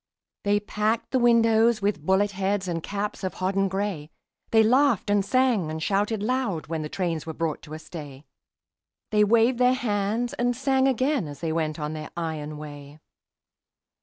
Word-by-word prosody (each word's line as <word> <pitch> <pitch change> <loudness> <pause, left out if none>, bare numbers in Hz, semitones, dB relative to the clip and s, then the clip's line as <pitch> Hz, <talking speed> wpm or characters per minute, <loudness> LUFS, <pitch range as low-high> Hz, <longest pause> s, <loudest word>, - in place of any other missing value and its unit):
They 205 0 +3
packed 210 +2 -1
the 260 - +2
windows 230 -1 +4
with 200 -7 -1
bullet 190 +4 +2
heads 195 0 -1
And 170 -2 -2
caps 205 +3 -4
of 185 - -3
hodden 195 +1 0
gray; 190 -6 -3 0.4
They 220 -1 +5
laughed 245 -3 +3
and 205 -1 +3
sang 245 -6 +2
and 155 - -4
shouted 205 +2 0
loud 225 - -1
When 160 0 -3
the 150 - -5
trains 165 -4 -2
were 160 - -5
brought 165 -2 -2
to 155 -1 -9
a - - -5
stay; 150 -3 -10 0.9
They 210 -1 +4
waved 230 +3 +3
their 250 0 +4
hands 225 +1 -1
and 245 -3 0
sang 265 +1 +2
again 260 - +1
As 145 -1 -9
they 165 -2 -1
went 155 -1 -2
on 150 0 -3
their 155 -1 -6
iron 155 -3 -4
way. 145 -1 -10
200 Hz, 175 wpm, -25 LUFS, 160-230 Hz, 0.9 s, They